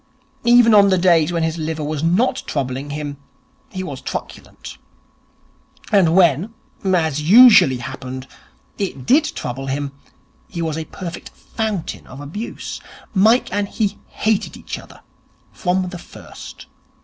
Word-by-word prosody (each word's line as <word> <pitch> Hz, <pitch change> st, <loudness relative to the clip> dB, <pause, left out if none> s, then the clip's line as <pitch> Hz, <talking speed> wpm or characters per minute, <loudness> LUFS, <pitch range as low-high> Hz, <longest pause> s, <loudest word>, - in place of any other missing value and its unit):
Even 240 Hz, -1 st, +6 dB
on 200 Hz, -1 st, +7 dB
the 190 Hz, -, +3 dB
days 175 Hz, -3 st, +3 dB
when 170 Hz, -1 st, -1 dB
his 160 Hz, +1 st, -2 dB
liver 155 Hz, 0 st, -3 dB
was 150 Hz, 0 st, -3 dB
not 180 Hz, +10 st, +1 dB
troubling 135 Hz, 0 st, -3 dB
him, 145 Hz, -1 st, -5 dB, 0.5 s
he 185 Hz, -1 st, -5 dB
was 185 Hz, -, -7 dB
truculent. -, -, -8 dB, 1.1 s
And 180 Hz, -6 st, +4 dB
when, 180 Hz, -, +3 dB, 0.3 s
as 160 Hz, -6 st, +1 dB
usually 190 Hz, -, +7 dB
happened, 130 Hz, +1 st, -7 dB, 0.5 s
it 160 Hz, -10 st, -4 dB
did 290 Hz, -, +5 dB
trouble 135 Hz, -, -5 dB
him, 140 Hz, +1 st, -3 dB, 0.6 s
he 175 Hz, -, -7 dB
was 160 Hz, -2 st, -2 dB
a 160 Hz, 0 st, -4 dB
perfect 170 Hz, +1 st, -8 dB
fountain 215 Hz, -6 st, -5 dB
of 135 Hz, -, -11 dB
abuse. 165 Hz, +11 st, -6 dB, 0.3 s
Mike 220 Hz, +3 st, +3 dB
and 205 Hz, 0 st, 0 dB
he 210 Hz, -3 st, -2 dB
hated 220 Hz, -2 st, -1 dB
each -, -, -6 dB
other -, -, -15 dB, 0.5 s
from 185 Hz, 0 st, -1 dB
the 175 Hz, -1 st, -8 dB
first. -, -, -12 dB
170 Hz, 135 wpm, -20 LUFS, 145-200 Hz, 1.1 s, on